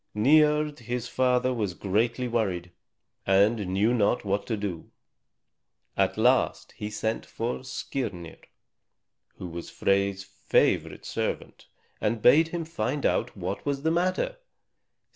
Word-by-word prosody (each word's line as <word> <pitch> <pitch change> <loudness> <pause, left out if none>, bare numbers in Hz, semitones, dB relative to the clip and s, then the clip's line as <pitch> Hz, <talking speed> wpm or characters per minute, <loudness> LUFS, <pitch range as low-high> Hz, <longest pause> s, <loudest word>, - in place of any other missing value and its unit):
Niörd 150 +5 +4
his 120 0 -4
father 125 0 +2
was 105 -7 -2
greatly 115 +5 0
worried, 95 -7 -1 0.6
and 100 +2 +3
knew 100 +6 +2
not 110 -1 +1
what 100 +1 -1
to 110 - -1
do; 95 -5 -5 1.1
at - - +1
last - - +2
he 105 - -6
sent 110 +1 -2
for 115 +2 -4
Skirnir, 105 -10 -5 0.9
who - - -8
was 85 0 -7
Frey's 100 0 0
favorite 100 0 0
servant, - - -4 0.3
and 110 +2 0
bade 150 +9 +6
him 165 0 -4
find 150 -4 -2
out 120 -2 0
what 95 +2 -4
was 140 -1 -2
the 160 - +2
matter. 185 - 0
115 Hz, 125 wpm, -27 LUFS, 100-130 Hz, 1.1 s, bade